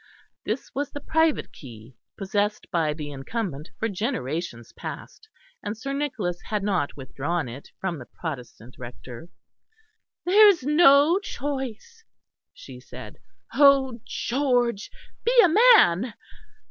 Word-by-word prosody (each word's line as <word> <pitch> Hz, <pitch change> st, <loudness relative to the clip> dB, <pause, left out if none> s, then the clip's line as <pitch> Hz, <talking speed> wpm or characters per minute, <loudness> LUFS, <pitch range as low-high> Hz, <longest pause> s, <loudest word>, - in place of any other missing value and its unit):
This -, -, -4 dB
was 285 Hz, 0 st, -2 dB
the 290 Hz, -, -7 dB
private 320 Hz, +1 st, +1 dB
key, 120 Hz, -2 st, -13 dB, 0.2 s
possessed 205 Hz, +1 st, -1 dB
by 165 Hz, -4 st, +1 dB
the 150 Hz, -1 st, -6 dB
incumbent 150 Hz, -, -5 dB
for 225 Hz, -, -1 dB
generations 175 Hz, -, -4 dB
past, 440 Hz, -, -9 dB, 0.3 s
and 210 Hz, +1 st, -5 dB
Sir 275 Hz, +5 st, -5 dB
Nicholas 230 Hz, -12 st, -3 dB
had 210 Hz, -2 st, -2 dB
not 185 Hz, -9 st, -1 dB
withdrawn 145 Hz, +4 st, -3 dB
it 125 Hz, +4 st, -10 dB
from 180 Hz, -5 st, -3 dB
the 125 Hz, -, -11 dB
Protestant 125 Hz, -6 st, -8 dB
Rector. 125 Hz, +5 st, -10 dB, 1.0 s
"There 415 Hz, +4 st, +7 dB
is 370 Hz, -9 st, +4 dB
no 300 Hz, +3 st, +5 dB
choice," 285 Hz, -, -6 dB, 0.5 s
she -, -, -12 dB
said. -, -, -11 dB, 0.3 s
"Oh! 275 Hz, -4 st, +5 dB
George, 245 Hz, -5 st, 0 dB, 0.3 s
be 480 Hz, -, +2 dB
a 335 Hz, -4 st, +3 dB, 0.2 s
man!" 210 Hz, -, +2 dB
210 Hz, 120 wpm, -25 LUFS, -, 1.0 s, There